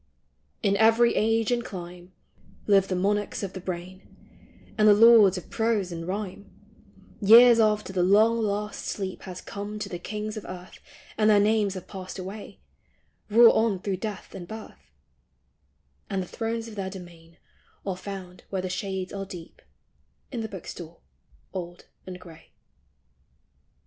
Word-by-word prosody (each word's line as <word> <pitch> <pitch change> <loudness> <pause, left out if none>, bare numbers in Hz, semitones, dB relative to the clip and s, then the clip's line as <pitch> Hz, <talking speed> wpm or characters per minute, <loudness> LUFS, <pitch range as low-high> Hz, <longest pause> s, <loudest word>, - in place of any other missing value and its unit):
In 200 -2 +3
every 225 +2 +5
age 225 +1 +2
and 240 -1 +1
clime 180 -2 -9 0.5
Live 195 -2 +4
the 185 - -1
monarchs 205 +3 -1
of 195 -1 -4
the 185 - -6
brain: 185 +1 -6 0.7
And 215 -1 +4
the 205 - +8
lords 215 -3 +7
of 180 - -9
prose 220 -5 0
and 165 0 -6
rhyme, 200 0 -5 0.7
Years 230 +3 +8
after 210 -3 +2
the 185 - +1
long 215 +5 +4
last 210 -1 -2
sleep 190 -2 -4
Has 180 0 -7
come 205 +1 -6
to 210 - -5
the 175 - -5
kings 210 +3 -5
of 215 - -7
earth 180 0 -10 0.4
And 215 0 +4
their 210 -1 +6
names 205 -1 +2
have 185 - -8
passed 185 -1 -8
away, 195 +3 -8 0.7
Rule 230 +2 +8
on 220 -3 +2
through 190 0 -2
death 210 0 -6
and 175 -2 -8
birth; 175 - -11 1.2
And 190 -1 -1
the - - -10
thrones 225 +2 -3
of 225 - -9
their 195 -2 -4
domain 170 -3 -12 0.5
Are 195 -2 -2
found 185 -1 -8
where 190 -2 -3
the 185 - -3
shades 190 -1 -4
are 195 -1 -5
deep 175 -3 -11 0.7
In 240 -4 -3
the 220 - -4
book 190 -4 -9
stall 170 -1 -9 0.5
old 175 -1 -7 0.2
and 180 -1 -7
gray. 165 -3 -15
195 Hz, 160 wpm, -26 LUFS, 185-215 Hz, 1.2 s, the